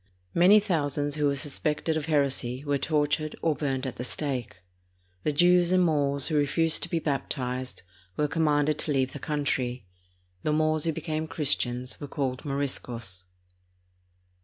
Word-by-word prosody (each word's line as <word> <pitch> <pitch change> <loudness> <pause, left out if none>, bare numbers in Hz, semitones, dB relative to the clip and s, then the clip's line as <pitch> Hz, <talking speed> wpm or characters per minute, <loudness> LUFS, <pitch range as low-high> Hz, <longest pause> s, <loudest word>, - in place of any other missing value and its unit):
Many 185 +5 +7
thousands 145 -7 -1
who 150 -1 +2
were 140 - +1
sus 140 0 -3
pected 155 +1 0
of 155 0 -2
heresy 135 -3 0
were 145 -1 0
tortured 150 +1 0
or 160 - +3
burned 135 -3 -2
at 130 - -5
the 125 - -4
stake. 125 - -4 0.6
The 150 - 0
Jews 175 +3 +4
and 185 -1 +4
Moors 140 -3 +2
wtio 155 -2 +2
refused 160 +3 +2
to - - -4
be 170 - 0
baptized 130 - -3 0.3
were 150 - +2
commanded 150 -2 +1
to 150 - 0
leave 130 -2 +1
the 145 - -6
country. 135 -6 -2 0.6
The 150 - 0
Moors 155 0 +2
who 165 - +2
became 155 0 -3
Christians 130 -5 -1
were 145 - -5
called 130 -3 -3
Moriscos. 120 -9 -2
145 Hz, 160 wpm, -27 LUFS, 135-155 Hz, 0.6 s, Many